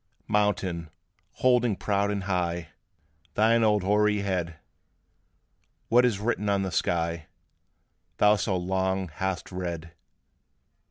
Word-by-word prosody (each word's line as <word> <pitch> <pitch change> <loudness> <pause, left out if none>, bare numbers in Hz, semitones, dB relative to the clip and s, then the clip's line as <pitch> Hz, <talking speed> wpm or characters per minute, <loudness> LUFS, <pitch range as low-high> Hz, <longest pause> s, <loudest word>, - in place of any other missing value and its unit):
Mountain, 100 -6 0 0.4
holding 125 -4 +2
proud 100 +1 0
and 100 -1 -2
high 85 -3 -2 0.7
Thine 115 +2 +4
old 105 -3 +3
hoary 105 +1 +2
head, 90 -4 -2 1.3
What 125 +2 +5
is 115 -5 +1
written 105 -1 -1
on 100 -1 +1
the 95 - -3
sky, 85 -2 -1 0.9
Thou 105 0 +5
so 100 -2 -1
long 95 0 -1
hast 95 +4 -4
read? 85 -2 -5
95 Hz, 110 wpm, -27 LUFS, 90-105 Hz, 1.3 s, What